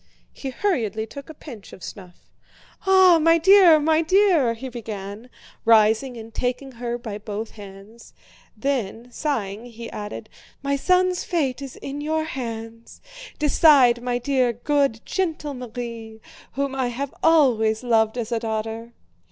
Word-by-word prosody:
He 270 Hz, -, -6 dB
hurriedly 235 Hz, -, -1 dB
took 280 Hz, +6 st, -11 dB
a -, -, -8 dB
pinch 240 Hz, -10 st, -11 dB
of 185 Hz, -, -12 dB
snuff. 180 Hz, -3 st, -10 dB, 0.7 s
"Ah, 375 Hz, -3 st, +6 dB
my 330 Hz, +1 st, +5 dB
dear, 360 Hz, -2 st, +7 dB
my 315 Hz, +1 st, +2 dB
dear!" 330 Hz, -, +3 dB
he 260 Hz, +4 st, -7 dB
began, 215 Hz, -2 st, -7 dB, 0.3 s
rising 225 Hz, +3 st, +3 dB
and 225 Hz, 0 st, -10 dB
taking 255 Hz, +3 st, -3 dB
her 240 Hz, 0 st, -3 dB
by 220 Hz, -4 st, -7 dB
both 215 Hz, +1 st, -6 dB
hands. 205 Hz, +2 st, -13 dB, 0.4 s
Then, 240 Hz, -2 st, -3 dB
sighing, 230 Hz, -6 st, -3 dB
he 230 Hz, -1 st, -9 dB
added: 210 Hz, +1 st, -7 dB, 0.4 s
"My 280 Hz, 0 st, 0 dB
son's 365 Hz, +4 st, +2 dB
fate 280 Hz, -7 st, -1 dB
is 275 Hz, -2 st, -8 dB
in 280 Hz, +1 st, -6 dB
your 315 Hz, +1 st, -1 dB
hands. 230 Hz, -6 st, -7 dB, 0.4 s
Decide, 280 Hz, -5 st, +5 dB
my 245 Hz, 0 st, -1 dB
dear, 250 Hz, -1 st, +1 dB
good, 275 Hz, -1 st, 0 dB
gentle 320 Hz, -6 st, -2 dB
Marie, 230 Hz, -3 st, -7 dB, 0.3 s
whom 280 Hz, 0 st, -2 dB
I 260 Hz, -2 st, -1 dB
have 260 Hz, +3 st, -4 dB
always 245 Hz, -9 st, +3 dB
loved 225 Hz, -1 st, +2 dB
as 235 Hz, -1 st, -4 dB
a 230 Hz, -, 0 dB
daughter!" 225 Hz, +1 st, -4 dB
245 Hz, 145 wpm, -23 LUFS, 225-290 Hz, 0.7 s, dear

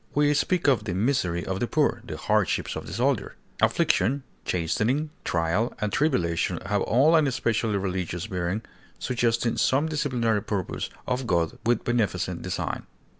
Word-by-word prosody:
We 145 Hz, 0 st, +4 dB
speak 170 Hz, +3 st, +1 dB
of 120 Hz, -7 st, +3 dB
the 90 Hz, -4 st, -2 dB
misery 95 Hz, -6 st, 0 dB
of 95 Hz, 0 st, -2 dB
the 120 Hz, -, 0 dB
poor, -, -, +1 dB
the -, -, -6 dB
hardships -, -, 0 dB
of -, -, -6 dB
the -, -, -6 dB
soldier. -, -, 0 dB, 0.3 s
Affliction, 130 Hz, +9 st, +2 dB, 0.2 s
chastening, 115 Hz, -, 0 dB
trial, 85 Hz, +8 st, 0 dB
and 105 Hz, -1 st, -1 dB
tribulation 85 Hz, -, +1 dB
have -, -, 0 dB
all 140 Hz, +8 st, +4 dB
an 155 Hz, -3 st, +4 dB
especially 115 Hz, -4 st, 0 dB
religious 90 Hz, -2 st, -2 dB
bearing, 95 Hz, +1 st, -2 dB, 0.3 s
suggesting 120 Hz, -1 st, 0 dB
some 140 Hz, +4 st, +2 dB
disciplinary 125 Hz, -8 st, 0 dB
purpose 100 Hz, -3 st, -3 dB, 0.2 s
of 125 Hz, 0 st, -1 dB
God 85 Hz, -5 st, 0 dB
with 120 Hz, -, +2 dB
beneficent 120 Hz, -4 st, 0 dB
design. -, -, -3 dB
115 Hz, 150 wpm, -26 LUFS, 95-130 Hz, 0.3 s, We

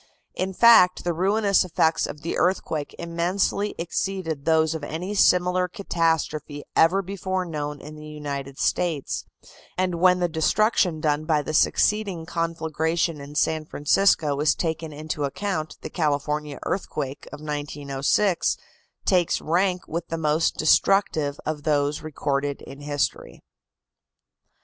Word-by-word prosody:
In 190 Hz, +1 st, -2 dB
fact, 190 Hz, -3 st, +6 dB
the 175 Hz, -, 0 dB
ruinous 200 Hz, +3 st, +2 dB
effects 160 Hz, -2 st, +1 dB
of 150 Hz, -, -8 dB
the 165 Hz, -, -2 dB
earthquake 160 Hz, -5 st, -1 dB
immensely 180 Hz, +4 st, -1 dB
exceeded 170 Hz, -3 st, -3 dB
those 160 Hz, -1 st, +3 dB
of 160 Hz, -2 st, -5 dB
any 170 Hz, +7 st, -4 dB
similar 180 Hz, -2 st, +3 dB
catastrophe 160 Hz, -6 st, -1 dB
ever 185 Hz, +5 st, +4 dB
before 190 Hz, -1 st, -3 dB
known 150 Hz, -3 st, -4 dB
in 150 Hz, +2 st, -10 dB
the 150 Hz, 0 st, -10 dB
United 140 Hz, -3 st, -6 dB
States, 165 Hz, -6 st, -1 dB, 0.5 s
and 180 Hz, -2 st, 0 dB
when 180 Hz, 0 st, +5 dB
the 175 Hz, -, +2 dB
destruction 175 Hz, +1 st, +1 dB
done 150 Hz, 0 st, 0 dB
by 155 Hz, -2 st, +1 dB
the 155 Hz, -, -4 dB
succeeding 195 Hz, 0 st, +2 dB
conflagration 165 Hz, -1 st, -1 dB
in 145 Hz, +1 st, -10 dB
San 155 Hz, +1 st, +1 dB
Francisco 150 Hz, -1 st, +2 dB
is 150 Hz, 0 st, +3 dB
taken 160 Hz, -1 st, -3 dB
into 150 Hz, 0 st, -4 dB
account 155 Hz, 0 st, -3 dB
the -, -, -6 dB
California 150 Hz, -2 st, -1 dB
earthquake 145 Hz, -7 st, -4 dB
of 150 Hz, -, -8 dB
1906 145 Hz, +4 st, 0 dB, 0.5 s
takes 180 Hz, -4 st, +2 dB
rank 180 Hz, +2 st, 0 dB
with 170 Hz, +1 st, -4 dB
the 165 Hz, -, -3 dB
most 155 Hz, +1 st, +1 dB
destructive 155 Hz, -3 st, +2 dB
of 155 Hz, -1 st, -3 dB
those 145 Hz, -1 st, 0 dB
recorded 145 Hz, -2 st, -2 dB
in 135 Hz, +1 st, -11 dB
history. 145 Hz, 0 st, -3 dB
160 Hz, 130 wpm, -24 LUFS, 150-180 Hz, 0.5 s, fact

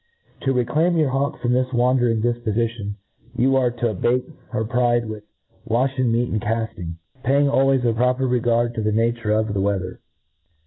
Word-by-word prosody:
To 135 Hz, -, +1 dB
reclaim 150 Hz, +8 st, +1 dB
your 155 Hz, -4 st, +2 dB
hawk 140 Hz, +3 st, -1 dB
from 120 Hz, 0 st, 0 dB
this 130 Hz, 0 st, +1 dB
wandering 120 Hz, -2 st, +2 dB
difpofition, 115 Hz, -3 st, -1 dB, 0.4 s
you 135 Hz, +3 st, +3 dB
are 130 Hz, -2 st, +3 dB
to 120 Hz, 0 st, -2 dB
abate 120 Hz, +6 st, 0 dB, 0.2 s
her 110 Hz, -, -2 dB
pride 120 Hz, 0 st, +1 dB
with 110 Hz, -1 st, -7 dB, 0.4 s
wa&ea 130 Hz, +3 st, 0 dB
meat 120 Hz, 0 st, +1 dB
and 110 Hz, -, -1 dB
cafting, 110 Hz, -7 st, -3 dB, 0.2 s
paying 140 Hz, +3 st, +3 dB
always 135 Hz, -2 st, +2 dB
a 115 Hz, -, +2 dB
proper 125 Hz, +3 st, +1 dB
xeganl 120 Hz, -1 st, +1 dB
to 115 Hz, -, -3 dB
the 110 Hz, 0 st, 0 dB
nature 115 Hz, 0 st, 0 dB
of 110 Hz, -1 st, +1 dB
the 100 Hz, -, 0 dB
weather. 95 Hz, -2 st, -2 dB
120 Hz, 170 wpm, -22 LUFS, 110-130 Hz, 0.4 s, you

